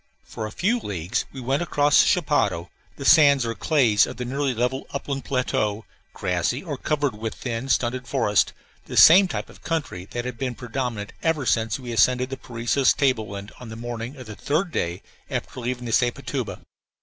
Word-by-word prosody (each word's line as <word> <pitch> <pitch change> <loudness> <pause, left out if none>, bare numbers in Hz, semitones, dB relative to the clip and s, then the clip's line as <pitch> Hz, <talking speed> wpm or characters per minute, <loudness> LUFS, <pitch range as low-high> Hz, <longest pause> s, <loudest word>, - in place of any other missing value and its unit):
For 110 - -6
a - - -9
few 220 - +1
leagues 95 - -3
we 135 - -8
went 135 +5 0
across 145 -3 +3
the - - +2
chapadao, 115 - +1 0.2
the 140 - -7
sands 140 -5 +6
or 115 - -2
clays 115 -6 +3
of - - -8
the 125 - -4
nearly 135 +1 -1
level 125 +3 -1
upland 140 -1 -4
plateau, 110 -5 -1 0.3
grassy 95 - -1
or 155 -6 -4
covered 145 -1 -1
with 110 +1 -5
thin, 125 +1 -4
stunted 125 0 0
forest, 105 -4 +2 0.3
the - - -6
same 185 +4 +9
type - - -4
of - - -16
country 145 - -3
that 120 +4 -5
had 125 -2 -5
been 125 -2 -2
predominant 120 -4 -4
ever 160 -4 0
since 110 0 +1
we 125 -2 -7
ascended 125 +3 +2
the 135 - -4
Parecis 120 +2 +1
table 130 -7 +1
land 100 +1 -7
on 125 - -9
the 110 - -7
morning 120 +2 -6
of 130 -2 -10
the 110 - -8
third 165 - -1
day 85 - -2 0.3
after - - -4
leaving 125 0 -3
the 115 - -4
Sepotuba. 120 +1 -1
125 Hz, 190 wpm, -24 LUFS, 110-140 Hz, 0.3 s, same